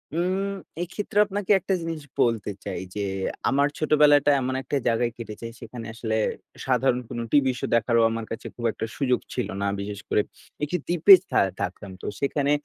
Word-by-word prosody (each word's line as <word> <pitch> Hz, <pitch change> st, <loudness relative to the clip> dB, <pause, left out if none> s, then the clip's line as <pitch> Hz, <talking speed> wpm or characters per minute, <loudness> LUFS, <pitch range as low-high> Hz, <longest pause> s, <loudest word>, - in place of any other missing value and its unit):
উম 190 Hz, +3 st, 0 dB, 0.3 s
এক্ষেত্রে 200 Hz, +3 st, -5 dB
আপনাকে 205 Hz, 0 st, -2 dB
একটা 190 Hz, -, -1 dB
জিনিস 165 Hz, -1 st, -4 dB, 0.2 s
বলতে 115 Hz, -4 st, +1 dB, 0.2 s
চাই -, -, -3 dB, 0.2 s
যে, 105 Hz, -, -2 dB, 0.5 s
আমার 140 Hz, +1 st, +3 dB
ছোটবেলাটা 145 Hz, -2 st, +5 dB
এমন 130 Hz, 0 st, -1 dB
একটা 140 Hz, -, -2 dB
জায়গায় 120 Hz, 0 st, +2 dB
কেটেছে, 115 Hz, -1 st, -7 dB
সেখানে 115 Hz, -2 st, -8 dB
আসলে 115 Hz, -1 st, -2 dB, 0.5 s
সাধারণ 125 Hz, -2 st, +2 dB
কোন -, -, -5 dB
টিভি 140 Hz, -3 st, +4 dB
শো -, -, -2 dB
দেখারও 115 Hz, 0 st, +3 dB
আমার 115 Hz, 0 st, -3 dB
কাছে 115 Hz, -, -5 dB
খুব 120 Hz, -, -5 dB
একটা 110 Hz, -, -4 dB
সুযোগ 125 Hz, -3 st, +2 dB
ছিল 125 Hz, -, -1 dB
না। 100 Hz, -, +1 dB
বিশেষ 100 Hz, 0 st, -5 dB
করে -, -, +3 dB, 0.4 s
একটি 150 Hz, +5 st, 0 dB
দ্বীপে 175 Hz, +3 st, +7 dB, 0.2 s
থা -, -, +3 dB, 0.2 s
থাকতাম। 95 Hz, +2 st, -4 dB
তো -, -, -8 dB
সেখানে 140 Hz, 0 st, +1 dB
130 Hz, 170 wpm, -25 LUFS, 115-155 Hz, 0.5 s, দ্বীপে